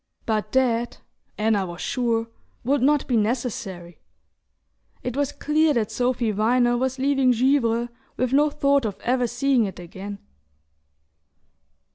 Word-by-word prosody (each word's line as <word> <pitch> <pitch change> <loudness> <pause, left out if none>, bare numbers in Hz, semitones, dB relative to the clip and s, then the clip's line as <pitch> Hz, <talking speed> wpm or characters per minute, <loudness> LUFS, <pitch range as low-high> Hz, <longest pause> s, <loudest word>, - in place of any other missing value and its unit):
But 215 -2 -1
that, 240 -2 +1 0.4
Anna 210 -2 +2
was 175 0 -8
sure, 230 -2 -1 0.4
would 275 +3 +1
not 290 +2 +3
be 250 - +1
necessary. 210 -6 -2 1.0
It 250 -1 -3
was 285 0 0
clear 305 0 +1
that 220 -3 0
Sophy 245 -2 0
Viner 240 +4 +2
was 260 +1 -1
leaving 270 -1 +2
Givre 240 -2 +2 0.3
with 255 0 0
no 295 +2 +4
thought 280 -2 +2
of 205 -3 -3
ever 250 0 +1
seeing 245 0 +1
it 195 - -6
again... 195 +3 -8
245 Hz, 130 wpm, -24 LUFS, 220-265 Hz, 1.0 s, no